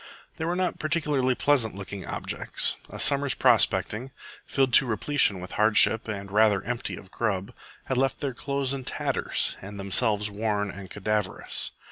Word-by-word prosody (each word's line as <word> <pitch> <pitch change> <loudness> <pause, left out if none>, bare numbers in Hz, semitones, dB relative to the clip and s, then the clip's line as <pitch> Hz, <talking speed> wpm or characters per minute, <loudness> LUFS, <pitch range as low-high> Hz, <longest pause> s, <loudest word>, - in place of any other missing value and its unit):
They 160 - -3
were 175 +2 -1
not 185 0 -1
particularly 150 -5 0
pleasant 125 -9 +1
looking 100 0 -7
objects. - - -1
A - - -9
summer's 140 -1 +3
prospecting, 120 +5 +2 0.4
filled 135 -3 +1
to 135 - +6
repletion 110 -2 +2
with 90 +1 -9
hardship 110 +1 +5
and 100 -2 -5
rather 105 -2 +3
empty 120 +1 -4
of 95 - -13
grub, 100 -5 -2 0.3
had 130 - -1
left 135 0 0
their 140 -2 -3
clothes 140 +1 -2
in 135 -1 -5
tatters - - -1
and 100 +1 -9
themselves 105 +1 +1
worn 105 -1 -1
and 95 0 -10
cadaverous. 105 -1 -2
110 Hz, 155 wpm, -26 LUFS, 100-135 Hz, 0.4 s, to